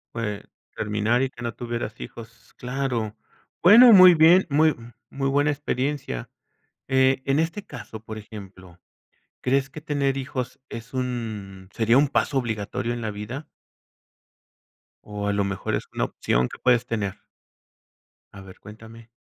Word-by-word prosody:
Pues, 105 -3 -3 0.3
terminar 105 +3 0
y 135 - -1
que 120 - -14
no 120 -1 -3
tuvieras 120 -2 -5
hijos, 115 0 -11
claro. 125 -4 -3 0.4
Bueno, 230 +7 +9
muy 185 -3 +9
bien, 170 +4 +6
muy 155 +2 +4 0.4
muy 135 0 -2
buena 145 +2 +2
experiencia. 140 - -3 0.6
Eh, 130 0 +3
en 135 +2 +2
este 165 +5 -2
caso, 110 - -9
por 110 -1 -8
ejemplo, 95 -4 -12 0.6
¿crees 135 +1 +1
que 145 +3 -10
tener 140 -3 -1
hijos 130 -1 -5
es 115 +3 -9
un 110 -7 -5
sería 115 +2 +3
un 145 - +4
paso 140 0 0
obligatorio 115 -1 -3
en 120 - -5
la 110 - -2
vida? 105 +8 -7 1.6
¿O 105 -1 -4
a 100 - +1
lo 100 - +1
mejor 100 -1 -2
es - - -3
una - - 0
opción 65 +1 -1
que - - -10
puedes 125 -2 +2
tener? 100 -4 -2 1.2
A 100 - -11
ver, 95 -1 -14
cuéntame. 110 +2 -13
120 Hz, 145 wpm, -24 LUFS, 105-140 Hz, 1.6 s, Bueno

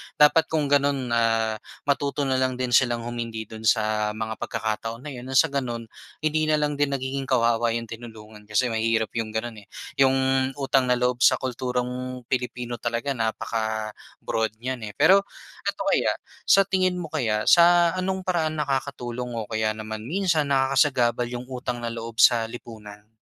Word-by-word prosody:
dapat 150 +2 +5
kung 150 -3 -1
gano'n 140 -3 +2
ah, 115 -1 +1 0.2
matuto 140 0 0
na 130 -1 +1
lang 130 -1 +1
din 125 0 -3
silang 120 -1 +3
humindi 115 -2 -4
do'n 110 +1 -6
sa 105 -1 +1
mga 110 0 -4
pagkakataon 115 +2 -3
na 150 - -6
'yon 125 -1 -8
ng 130 - -4
sa 130 - +5
gano'n 125 -4 -2 0.4
hindi 155 0 +1
na 155 - +3
lang 150 -1 -1
din 140 -1 +1
nagiging 135 0 -3
kawawa 115 -2 +2
'yong 115 -1 -5
tinulungan. 110 -2 -11
Kasi 115 +4 +1
mahirap 110 0 0
'yong 110 -1 -4
gano'n 110 -1 -3
eh. 100 - -18 0.3
'Yong 135 0 +2
utang 135 -2 +1
na 125 - +3
loob 125 0 0
sa - - +6
kulturang 125 0 -3
Pilipino 125 -1 -2
talaga 120 +4 -2
napaka-broad 110 -1 -3
niyan, 120 -1 -5
eh. 105 - -8
Pero 195 - +6 0.5
eto - - -2
kaya, - - +2 0.4
sa 195 - +6
tingin 185 -1 +1
mo 170 -4 -6
kaya, 110 -8 0
sa 175 0 +6
ano'ng 185 0 -2
paraan 160 -4 0
nakakatulong 140 -2 -2 0.3
o 115 -3 -4
kaya 110 -1 0
naman 110 0 -6
minsan 170 -3 +1
nakakasagabal 135 -3 +2
'yong 120 0 -6
utang 125 -1 -4
na - - -1
loob 115 -1 -7
sa 115 -2 +6
lipunan? 110 -3 -11
125 Hz, 170 wpm, -25 LUFS, 115-140 Hz, 0.5 s, sa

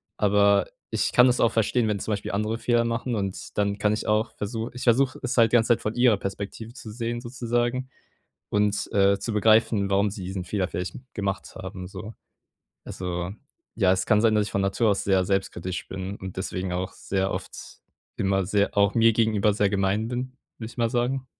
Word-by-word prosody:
Aber 100 0 +4 0.3
ich - - 0
kann 125 - +6
das 125 -1 +3
auch 115 - +4
verstehen, 115 +1 +1
wenn 105 -2 -1
zum 110 - -4
Beispiel 100 - -2
andere 110 +3 -1
Fehler 120 -1 +2
machen 115 +1 -2
und 100 -2 -4
dann 100 0 0
kann 105 +1 +2
ich 110 - -3
auch 110 +1 0
versu 110 +3 -3
ich 125 - -7
versuche 130 +2 +3
es 125 -1 -1
halt 115 -2 +5
die - - +4
ganze 115 0 +3
Zeit 120 - +3
von 110 - -3
ihrer 120 -4 +4
Perspektive 100 +3 -6
zu 115 -4 -9
sehen 120 +1 -3
sozusagen 120 +1 -2 0.6
und, 105 0 0
äh, 100 0 +4
zu 115 - -4
begreifen, 110 -1 +3
warum 100 +1 +3
sie 95 -2 -7
diesen 95 0 -4
Fehler 95 0 -1
vielleicht 90 +1 -4 0.2
gemacht 100 -1 -3
haben 95 -1 -7
so. 105 +4 -8 0.7
Also, 90 0 -4 0.4
ja, 95 -4 +3
es 95 - +1
kann 105 -2 +4
sein, 110 -2 +4
dass 105 -1 +2
ich 100 - -7
von 100 - 0
Natur 100 +3 +1
aus 100 - -1
sehr 95 -2 +2
selbstkritisch 95 -2 -2
bin 95 +1 -5
und 95 -2 -8
deswegen 95 -1 -3
auch 90 +1 -3
sehr 95 0 -2
oft - - -5 0.6
immer 95 -1 +1
sehr 100 +1 0
auch 100 0 +4
mir 115 0 +6
gegenüber 110 -2 +2
sehr 105 -1 +2
gemein 100 +2 0
bin, 125 +2 -4 0.2
würde 110 - -5
ich - - -19
mal 115 -1 +1
sagen. 125 +2 -1
105 Hz, 205 wpm, -25 LUFS, 95-115 Hz, 0.7 s, kann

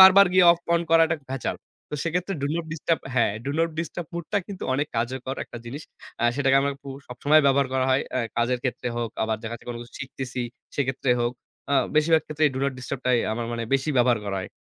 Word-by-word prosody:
বারবার 190 +1 +10
গিয়ে 185 -1 +6
off 170 0 +2
on 170 - +3
করাটা 165 0 +5
ভেজাল। 135 -2 -2 0.3
তো - - -3
সেক্ষেত্রে 180 +3 -1
do 140 - +1
not 170 -1 -2
disturb 160 +1 0
হ্যাঁ 120 -4 +3
do - - 0
not 165 0 +3
disturb 170 0 -4
mode 170 -2 -4
টা - - +4
কিন্তু 195 -2 -7
অনেক 145 +3 0
কার্যকর 130 +3 -2
একটা 120 - -9
জিনিস। 135 +6 -6 0.4
অ্যা 120 - +2
সেটাকে 135 -1 +4
আমার 140 0 0
খুব 140 -1 -7 0.2
সবসময় 145 +5 +4
ব্যবহার 140 0 +4
করা 130 0 +2
হয়। 130 - +3
অ্যা 130 - +1 0.2
কাজের 120 +1 +1
ক্ষেত্রে 125 -1 -2
হোক 120 -2 -2
আবার 110 0 0
দেখা 115 0 -5
যাচ্ছে 120 - -12
কোন 120 - -4
কিছু 120 - -16
শিখতেছি 130 -2 -5 0.4
সেক্ষেত্রে 130 -1 0
হোক। 120 0 +1 0.4
আ - - +5 0.2
বেশিরভাগ 160 +1 +4
ক্ষেত্রেই 155 -1 +2
do - - -2
not 140 - +1
disturb 130 +1 -5
টাই 125 -1 +4
আমার 115 +1 -3
মানে 115 0 -2
বেশি 135 +2 0
ব্যবহার 120 -2 +4
করা 100 -1 -2
হয়। - - -6
135 Hz, 225 wpm, -25 LUFS, 120-160 Hz, 0.4 s, বারবার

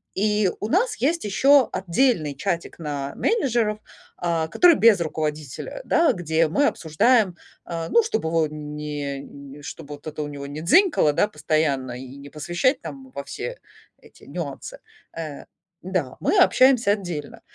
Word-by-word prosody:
И 210 -1 +2
у 210 - -1
нас 440 - +2
есть 325 +3 0
еще 260 +6 +4
отдельный 180 - +1
чатик 170 +3 -3
на 145 -3 -4
менеджеров, 240 - +1 0.4
а, 165 -2 -1
который 340 - +5
без 225 -7 +5
руководителя, 155 - -4
да, 335 0 +3
где 165 -2 +1
мы 285 - +2
обсуждаем, 185 +5 +2 0.3
э, 165 -1 -3
ну, 465 - +5
чтоб 450 - -2
его 160 -1 +1
не 150 -2 -5 0.4
н - - -12
чтоб 145 - -9
вот 145 +1 -9
это 155 0 -4
у - - -4
него 140 -1 -7
не 145 +2 -6
дзинькало, 295 - +4
да, 205 - +2
постоянно 155 -9 -1
и 130 +1 -10
не 140 0 -11
посвящать, 175 - 0
там, 265 -1 -9
во - - -6
все - - -6 0.4
эти - - -20
нюансы. - - -6 0.4
Э, 155 -4 -6 0.4
да, 175 -8 -2
мы 405 - +1
общаемся 255 - +5
отдельно. 175 -8 -4
170 Hz, 155 wpm, -23 LUFS, 150-250 Hz, 0.4 s, который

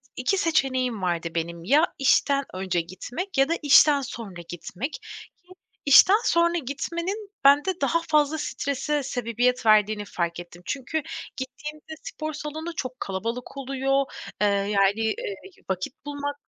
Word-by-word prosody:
2 260 +10 0
seçeneğim 260 - +1
vardı 170 -2 -1
benim 170 0 -3
ya 300 - +3
işten 275 +1 +3
önce 185 -2 -1
gitmek 245 - -6
ya 270 +3 +4
da - - +2
işten 290 0 +6
sonra 205 -8 -7
gitmek. 180 - -5
Ki 430 -4 -12 0.3
işten 355 +8 +8
sonra 340 0 +3
gitmenin 340 - -4
bende 295 +7 +4
daha 335 0 +2
fazla 305 -1 +2
strese 285 0 -2
sebebiyet 245 -1 0
verdiğini 215 -1 +4
fark 170 -3 -3
ettim. 175 0 -11
Çünkü 290 +3 -2 0.4
gittiğimde 300 +4 -7
spor 310 0 -5
salonu 315 +3 -6
çok 255 -2 -5
kalabalık 230 +8 -4
oluyor, 270 0 0 0.4
eee, 210 - +5
yani, 200 +1 +2
eee, 215 -2 -2 0.3
vakit 190 - -4
bulmak 285 0 -4
270 Hz, 135 wpm, -25 LUFS, 210-305 Hz, 0.4 s, işten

